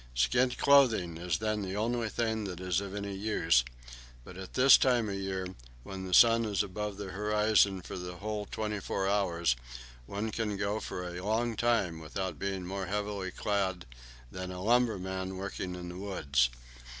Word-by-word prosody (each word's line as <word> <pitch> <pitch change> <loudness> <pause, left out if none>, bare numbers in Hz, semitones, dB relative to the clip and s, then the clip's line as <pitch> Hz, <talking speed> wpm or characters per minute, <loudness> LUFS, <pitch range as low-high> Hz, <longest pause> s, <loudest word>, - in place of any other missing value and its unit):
Skin 65 - +3
clothing 125 -11 +4
is 85 -2 -1
then 110 0 -1
the 95 0 -4
only 115 +1 0
thing 110 -1 -1
that 90 -3 -5
is 90 0 0
of 100 0 -6
any 100 -1 -4
use; 95 - +2 0.6
but 90 - -11
at 95 0 -9
this 130 +1 +8
time 120 -4 +3
of - - -2
year, 95 -1 -3 0.4
when 95 +3 -6
the 90 - -4
sun 115 0 +7
is 105 -2 0
above 105 +1 -4
the 100 -2 -6
horizon 105 -1 +2
for - - -6
the 90 0 -6
whole 105 +2 -4
twenty 105 -1 -3
four 95 0 -2
hours, 85 -9 +1 0.5
one 105 +2 -3
can 105 -3 -2
go 105 +1 -1
for 90 -3 -5
a 90 +1 -6
long 115 +3 0
time 110 -8 +1
without 95 +4 -4
being 95 -2 -3
more 95 0 -4
heavily 100 -1 -2
clad 95 - -1 0.5
than 90 0 -5
a 90 - -6
lumberman 95 -5 +1
working 95 -1 -4
in 90 -1 -7
the 90 - -8
woods. 70 -11 +1
100 Hz, 175 wpm, -31 LUFS, 90-110 Hz, 0.6 s, this